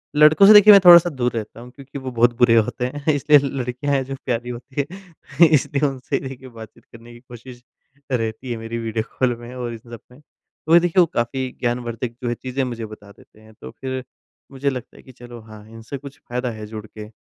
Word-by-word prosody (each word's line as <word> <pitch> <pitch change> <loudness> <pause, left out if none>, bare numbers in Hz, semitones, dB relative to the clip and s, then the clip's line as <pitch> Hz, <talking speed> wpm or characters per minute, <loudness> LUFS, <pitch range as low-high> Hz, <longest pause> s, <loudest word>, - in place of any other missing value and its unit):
लड़कों 150 +6 +6
से 215 - +9
देखिए 210 0 +9
मैं 200 - +9
थोड़ा-सा 175 0 +9
दूर 125 -5 -2
रहता 110 0 -6
हूँ, 125 +1 -12
क्योंकि 140 +1 -11
वो 130 -1 -6
बहुत 120 0 +2
बुरे 120 -1 +4
होते 115 +2 0
हैं, 145 +3 -2
इसलिए 145 +1 +4
लड़कियाँ 130 +2 -3
हैं, 135 -1 +1
जो 135 +1 -6
प्यारी 120 -1 -3
होती 130 +4 -5
हैं, 170 -5 0
इसलिए 145 -1 +1
उनसे 130 -2 -4
देखिए 130 0 -10
बातचीत 110 -2 -14
करने 115 +1 -15
की 120 - -14
कोशिश 120 0 -13 0.5
रहती 115 +1 -3
है 120 - -3
मेरी 115 +1 -6
वीडियो 115 -1 -3 0.2
कॉल 125 -2 +1
में 120 +1 -11
और 120 -2 -5
इन - - -7
सब 115 0 -12
में। 125 - -17
तो 160 +2 -7
ये 170 - +9
देखिए, 175 +1 0
वो 175 - +6
काफ़ी 130 +2 -2
ज्ञानवर्धक 120 -1 -3
जो 120 - -1
है 120 - -2
चीज़ें 130 +2 -4
मुझे 120 -3 -5
बता 105 -2 -13
देते 105 - -22
हैं, 110 0 -18
तो - - -12
फिर 130 -1 -4 0.5
मुझे 140 +1 -2
लगता 130 -3 -8
है - - -16
कि 130 - -15
चलो 120 -1 -12
हाँ, 110 -1 -14
इनसे 115 +4 -9
कुछ 140 +1 -12
फ़ायदा 125 0 -3
है 110 -1 -8
जुड़ 110 0 -8
के। 105 0 -11
125 Hz, 225 wpm, -21 LUFS, 115-140 Hz, 0.5 s, से